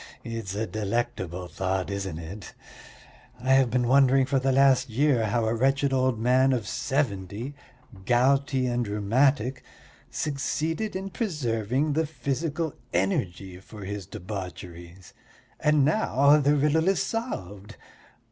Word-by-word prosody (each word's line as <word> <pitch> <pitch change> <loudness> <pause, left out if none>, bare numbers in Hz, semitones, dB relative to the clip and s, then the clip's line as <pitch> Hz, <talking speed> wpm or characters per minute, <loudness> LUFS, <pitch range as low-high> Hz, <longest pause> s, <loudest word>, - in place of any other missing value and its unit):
It's 115 -4 -5
a 110 +2 -1
delectable 105 -5 -3
thought, 95 +3 -2
isn't 95 -4 -4
it? 90 +6 -9 0.8
I 130 +2 +2
have 135 -2 +4
been 125 0 +1
wondering 135 0 +5
for 135 0 +1
the 135 +1 +1
last 135 -1 +4
year 125 -1 +2
how 115 +2 0
a 110 - +1
wretched 135 +3 +1
old 130 -2 +1
man 130 +4 +3
of 120 -4 -2
seventy, 120 -2 -2 0.5
gouty 130 +2 +2
and 120 -2 -1
rheumatic, 125 +5 +1 0.5
succeeded 160 +7 -2
in 190 +1 -4
preserving 135 - -1
the 160 +1 0
physical 155 +3 -3 0.2
energy 95 -1 -1
for 100 +1 -11
his 100 -2 -5
debaucheries 90 -3 -8 0.5
and 150 -2 +3
now 145 -4 +4
the 145 0 +3
riddle 150 +4 +2
is 195 -1 +2
solved! 105 - -5
125 Hz, 130 wpm, -26 LUFS, 100-140 Hz, 0.8 s, wondering